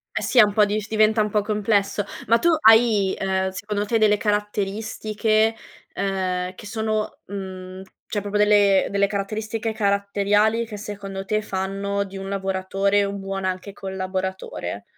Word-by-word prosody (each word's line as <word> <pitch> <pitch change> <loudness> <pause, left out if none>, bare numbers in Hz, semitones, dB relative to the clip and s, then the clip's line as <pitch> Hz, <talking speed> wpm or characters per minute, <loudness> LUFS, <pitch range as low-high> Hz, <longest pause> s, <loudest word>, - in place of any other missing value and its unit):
Eh - - 0
sì, 255 - -2
è 225 - +10
un 205 -1 +1
po'dif 210 0 +2
diventa 215 0 +3
un 210 - -3
po' 210 - +2
complesso, 205 -1 0 0.2
ma 230 +2 +5
tu 340 - +2 0.2
hai, 220 -4 +5
ehm, 190 0 0
secondo 205 +2 -3
te 225 +2 +1
delle 215 -1 +4
caratteristiche, 215 +1 0 0.4
ehm, 185 -2 -2
che 210 - -12
sono, 215 0 -2
mhmm, 185 -1 -7 0.2
cioè 205 - -3
proprio 205 +1 -2
delle 205 -2 +4
delle 200 0 +2
caratteristiche 215 +3 -3
caratteriali, 205 +2 +1
che 210 -2 -7
secondo 195 -2 -6
te 215 +2 0
fanno 200 0 -2
di 195 0 -9
un 195 0 -6
lavoratore 195 +1 0
un 200 0 -4
buon 195 0 -4
anche 185 +2 -3
collaboratore? 190 - -4
200 Hz, 150 wpm, -23 LUFS, 195-215 Hz, 0.4 s, è